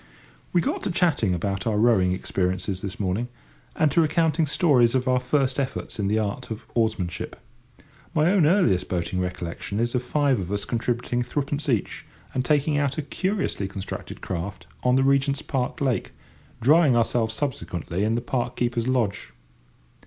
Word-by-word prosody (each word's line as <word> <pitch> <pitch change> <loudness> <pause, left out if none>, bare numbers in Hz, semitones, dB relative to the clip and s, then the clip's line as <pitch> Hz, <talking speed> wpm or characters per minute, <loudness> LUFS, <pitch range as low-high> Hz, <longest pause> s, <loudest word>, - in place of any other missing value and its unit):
We 175 - +3
got - - -1
to - - -2
chatting 155 - +2
about 100 +5 -2
our 110 -2 +1
rowing 105 -5 +4
experiences 95 0 -1
this 95 -1 -5
morning, 100 +4 -1 0.5
and 155 -5 +3
to 165 - +4
recounting 160 0 +2
stories 135 -6 +4
of 130 0 +1
our 130 0 +3
first 130 +1 +1
efforts 130 -4 -3
in 100 - 0
the 105 +2 +2
art 110 +4 -2
of 110 -2 -6
oarsmanship. 110 -7 -1 0.8
My 160 +3 +4
own 185 -7 +4
earliest 155 - +3
boating 90 +1 -1
recollection 90 +1 -4
is 120 +1 0
of 125 - +1
five 135 -1 +1
of 90 0 -4
us 100 -1 -1
contributing 120 +1 -1
threepence 145 +3 -2
each 115 -6 -1 0.3
and 130 - 0
taking 145 +1 +2
out 140 0 0
a 155 - -1
curiously 190 - -2
constructed 95 0 -7
craft 95 +2 -5 0.2
on 125 0 +3
the 135 - +4
Regent's 140 +1 +2
Park 130 -2 -2
lake, 130 -4 -1 0.5
drying 145 0 +5
ourselves 115 -1 +1
subsequently, 100 - -3
in 110 +2 +1
the 120 - 0
park 120 0 -2
keeper's 120 -1 -1
lodge. 115 -6 -1
120 Hz, 165 wpm, -25 LUFS, 100-140 Hz, 0.8 s, drying